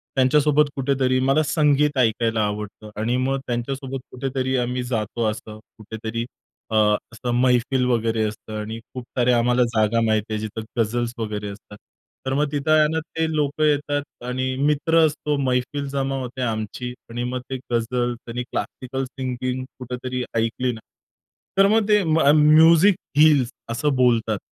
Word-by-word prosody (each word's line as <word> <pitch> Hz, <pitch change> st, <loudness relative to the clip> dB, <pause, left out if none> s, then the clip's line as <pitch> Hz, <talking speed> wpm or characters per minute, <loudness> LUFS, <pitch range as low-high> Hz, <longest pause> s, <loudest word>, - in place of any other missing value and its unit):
त्यांच्यासोबत 145 Hz, +2 st, +3 dB
कुठेतरी 130 Hz, -1 st, +1 dB
मला 135 Hz, +4 st, +3 dB
संगीत 150 Hz, -2 st, +2 dB
ऐकायला 115 Hz, -1 st, +2 dB
आवडतं 105 Hz, +1 st, -5 dB
आणि 120 Hz, +3 st, 0 dB
मग 135 Hz, +1 st, 0 dB
त्यांच्यासोबत 130 Hz, +2 st, -3 dB
कुठेतरी 130 Hz, 0 st, -2 dB
आम्ही 125 Hz, 0 st, -1 dB
जातो, 115 Hz, -1 st, -2 dB
असं 110 Hz, 0 st, -9 dB, 0.2 s
कुठेतरी 110 Hz, +1 st, -5 dB, 0.5 s
अ, -, -, 0 dB, 0.4 s
असं 120 Hz, +2 st, -4 dB
मेहफ़िल 125 Hz, +1 st, +2 dB
वगैरे 115 Hz, -2 st, +1 dB
असतं 105 Hz, +1 st, -8 dB
आणि 110 Hz, +2 st, -5 dB
खूप 125 Hz, -, -6 dB
साऱ्या 125 Hz, -1 st, +3 dB
आम्हाला 125 Hz, +1 st, +3 dB
जागा 110 Hz, +1 st, +2 dB
माहीत 110 Hz, -1 st, +2 dB
आहे 110 Hz, -, -1 dB
जिथं 110 Hz, +1 st, -5 dB, 0.2 s
गझल्स 120 Hz, +2 st, 0 dB
वगैरे 105 Hz, -2 st, -4 dB
असतात. 105 Hz, +1 st, -11 dB, 0.5 s
तर 130 Hz, -, -1 dB
मग 145 Hz, 0 st, 0 dB
तिथं 145 Hz, +1 st, -1 dB
आहे 155 Hz, -1 st, +5 dB
ना, 160 Hz, -, +1 dB
ते 160 Hz, 0 st, -3 dB
लोकं 150 Hz, +1 st, 0 dB
येतात 145 Hz, -1 st, +1 dB, 0.2 s
आणि 130 Hz, +1 st, -2 dB
मित्र 160 Hz, +2 st, +3 dB
असतो 150 Hz, -1 st, -1 dB
मैफिल 130 Hz, +2 st, -1 dB
जमा 135 Hz, 0 st, -1 dB
होते 130 Hz, 0 st, -6 dB
आमची 115 Hz, +1 st, -3 dB, 0.2 s
आणि 120 Hz, +1 st, -4 dB
मग 125 Hz, +1 st, -3 dB
ते 130 Hz, -, -3 dB
गझल 120 Hz, +1 st, 0 dB
त्यांनी 120 Hz, +1 st, -6 dB
क्लासिकल 130 Hz, +1 st, -4 dB
सिंगिंग 130 Hz, -1 st, -4 dB, 0.2 s
कुठेतरी 125 Hz, 0 st, -4 dB
ऐकली 115 Hz, +3 st, 0 dB
ना, 110 Hz, -, -9 dB, 0.8 s
तर 195 Hz, 0 st, +6 dB
मग 220 Hz, -2 st, +2 dB
ते 210 Hz, -1 st, +5 dB
मग 160 Hz, -3 st, +3 dB
म्यूझिक 160 Hz, +5 st, +6 dB, 0.2 s
हील्स 145 Hz, -5 st, +5 dB, 0.2 s
असं 135 Hz, +4 st, 0 dB
बोलतात. 115 Hz, -4 st, +2 dB
125 Hz, 155 wpm, -22 LUFS, 115-140 Hz, 0.8 s, तर